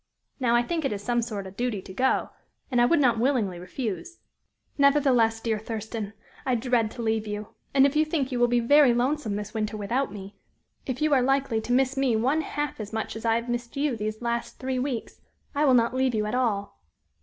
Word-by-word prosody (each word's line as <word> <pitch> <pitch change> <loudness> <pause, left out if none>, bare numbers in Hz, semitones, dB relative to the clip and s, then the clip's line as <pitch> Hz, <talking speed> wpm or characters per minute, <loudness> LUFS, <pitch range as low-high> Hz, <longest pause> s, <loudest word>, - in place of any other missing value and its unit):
Now, 240 -2 +2
I 240 - +4
think 330 +4 -2
it 275 - 0
is 205 -1 -4
some 240 +1 +1
sort 215 -4 -4
a 190 - -8
duty 235 +1 -2
to 190 - -10
go, 260 +7 +1 0.4
and 245 -1 +3
I - - +6
would 330 +6 +3
not 245 -5 +3
willingly 225 -8 +1
refuse. 225 - -5 0.6
Nevertheless, 265 -6 +4
dear 225 -1 -1
Thurston, 220 -1 -5 0.3
I 255 - +1
dread 235 -2 +1
to 240 - -6
leave 220 -1 0
you, 210 0 -5 0.2
and 275 0 +5
if 280 +1 +1
you 305 - +5
think 305 -4 -1
you 250 - -1
will 240 - +5
be 240 0 +2
very 275 0 +5
lonesome 250 -3 0
this 210 0 -5
winter 215 -1 -2
without 235 +5 -1
me 200 0 -9 0.5
if 260 +2 -2
you 310 -1 +3
are 265 - +5
likely 265 -3 +1
to 240 - -5
miss 265 +2 +2
me 265 -4 +2
one 265 +8 +2
half 295 -3 -4
as 210 -1 -6
much 220 0 -3
as 220 +1 -7
I 225 0 +3
have 235 +1 -2
missed 240 +2 -4
you 285 -3 +1
these 215 +1 -4
last 235 0 -2
three 260 -1 -2
weeks, 250 -3 -4 0.3
I 295 +1 +2
will 260 -3 +5
not 235 0 +3
leave 260 -2 +1
you 210 -1 0
at 210 - -3
all." 205 - -1
240 Hz, 225 wpm, -26 LUFS, 220-265 Hz, 0.6 s, I